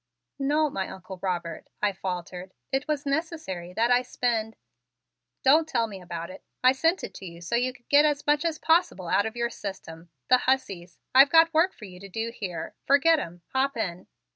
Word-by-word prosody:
"No, 295 +3 +2
my 190 -5 -3
Uncle 190 0 -9
Robert," 175 -3 -3
I 210 - +2
faltered. 185 -1 -6 0.2
"It 270 +2 -1
was 295 -2 -2
necessary 280 - -3
that 230 +5 +1
I 245 0 +5
spend 230 -3 -2 0.5
" - - -58
"Don't 310 +4 +5
tell 230 -7 +1
me 200 -4 -9
about 170 -1 -6
it. - - -12 0.2
I 255 - +7
sent 325 +7 +1
it - - -6
to 195 - -10
you 170 0 -10
so 175 +7 -3
you 250 +2 +1
could 245 -2 -21
get 290 +1 +6
as 295 -1 +1
much 295 +1 +2
as 330 -2 -1
possible 320 - +1
out 205 - +2
of 220 - -7
your 235 0 -1
system. 175 -6 -8 0.2
The 255 - +5
hussies! 195 -10 -1 0.2
I've 270 +2 +8
got 330 +1 +5
work 330 +4 +4
for 215 - -12
you 180 -2 -12
to 200 +1 -11
do 225 +4 -3
here. 185 -7 -5
Forget 305 +4 +5
'em! 170 - -8
Hop 265 0 +1
in!" 180 -5 -4
235 Hz, 205 wpm, -26 LUFS, 185-285 Hz, 0.5 s, I've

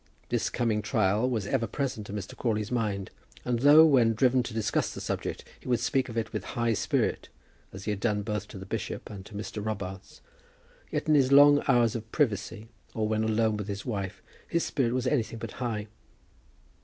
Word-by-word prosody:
This - - 0
coming 115 -3 0
trial 105 +5 +1
was 110 -6 -1
ever 115 +3 0
present 130 -7 -3
to - - -8
Mr. 100 -2 -6
Crawley's 110 -2 -1
mind, 105 -5 -1 0.3
and 120 -2 0
though, 145 +5 +8
when 120 -7 +4
driven 125 +2 +3
to 125 - -5
discuss 110 -1 0
the - - -7
subject, - - -3 0.2
he - - -14
would 120 -2 +2
speak 135 -1 0
of 115 - -6
it 115 - -2
with 105 - -3
high 115 -1 0
spirit, - - 0 0.4
as 95 +1 -9
he 105 - 0
had 105 - -3
done 105 -2 0
both 105 -1 -3
to - - -10
the 95 - -8
bishop - - -5
and 100 -2 -9
to 105 - -12
Mr. 105 0 -5
Robarts, 95 -3 -6 0.7
yet - - -2
in 155 - +4
his 135 -3 +4
long 145 +1 +8
hours 120 -4 +3
of 110 -1 -6
privacy, 110 -5 -1 0.3
or 110 -1 0
when 110 0 0
alone 110 0 +1
with 105 -1 -5
his 100 -1 -5
wife, 100 -4 -4 0.2
his 170 - 0
spirit 125 -5 0
was 130 0 -1
anything 125 -4 0
but - - -6
high. 110 -4 -2
110 Hz, 205 wpm, -28 LUFS, 105-125 Hz, 0.7 s, though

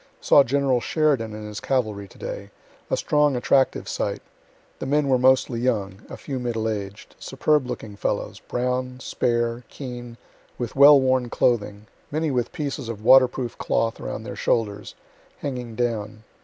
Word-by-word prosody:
Saw 140 - +6
General 135 -1 +1
Sheridan 135 -9 0
and 105 0 -7
his 105 -1 -6
cavalry 110 -6 -1
to - - -18
day; - - -6 0.4
a - - +1
strong, 150 - +2
attractive 130 +2 +2
sight; - - -3 0.6
the - - -4
men 145 +1 +2
were 130 -1 +3
mostly 130 -2 +3
young, 105 -5 -1
(a - - -8
few 135 -3 -5
middle 115 -3 -2
aged,) 100 -2 -5
superb 140 0 +1
looking 110 -4 -6
fellows, - - -3
brown, 125 +1 -2
spare, 120 -1 -1
keen, 120 -3 -8 0.4
with 120 -2 -4
well 140 +1 +8
worn 130 -2 +1
clothing, 105 -4 0 0.2
many 155 0 -1
with 125 -2 -1
pieces 140 -5 -4
of 110 -2 -6
water 130 0 +8
proof 125 -1 -6
cloth 115 0 0
around - - -5
their - - -7
shoulders, 105 -3 -1 0.5
hanging 125 -5 -5
down. 110 -3 -2
125 Hz, 155 wpm, -24 LUFS, 110-135 Hz, 0.6 s, well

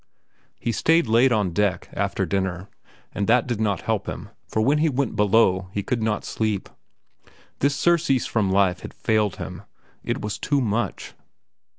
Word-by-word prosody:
He 115 - -1
stayed 160 +8 +3
late 120 +3 +4
on 105 -6 +1
deck, 100 -2 0
after - - -1
dinner, 95 -1 -2 0.4
but 100 -1 -2
that 120 +1 +4
did 120 -4 -2
not 100 -5 0
help - - -2
him, - - -7 0.2
for - - -2
when 140 +7 +3
he 160 +1 +3
went 135 -4 -1
below, 100 -3 +3
he 100 - -2
could 120 +2 -1
not 110 -1 -1
sleep. 110 -3 -2 0.9
This 140 0 +2
surcease 155 -5 +2
from 105 -4 0
life 95 -2 +2
had - - -10
failed 110 -3 +1
him. - - -7 0.4
It - - -2
was 105 0 -4
too 145 +4 +1
much. 120 -1 -2
110 Hz, 170 wpm, -23 LUFS, 100-125 Hz, 0.9 s, late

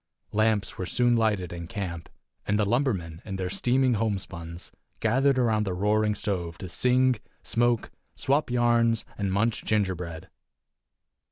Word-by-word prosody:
Lamps 110 -1 +1
were 95 - -2
soon 120 -1 +3
lighted 105 -6 +1
in 85 -1 -6
camp, 90 -5 -5 0.4
and 105 - +2
the 105 - +2
lumbermen, 100 - -1
in 100 -3 -5
their 95 -1 -3
steaming 125 +5 +2
homespuns, 95 -6 -4 0.3
gathered 130 +4 +3
about 110 -4 +2
the 95 -3 -2
roaring 105 +2 +2
stove 90 -5 -2
to 95 - -7
sing, 125 +5 +3 0.3
smoke, 120 -1 +1 0.2
swap 140 +1 +1
yarns 120 -2 +2
and 100 -2 -2
munch 110 +4 0
gingerbread. 90 -6 -1
105 Hz, 140 wpm, -27 LUFS, 95-120 Hz, 0.4 s, soon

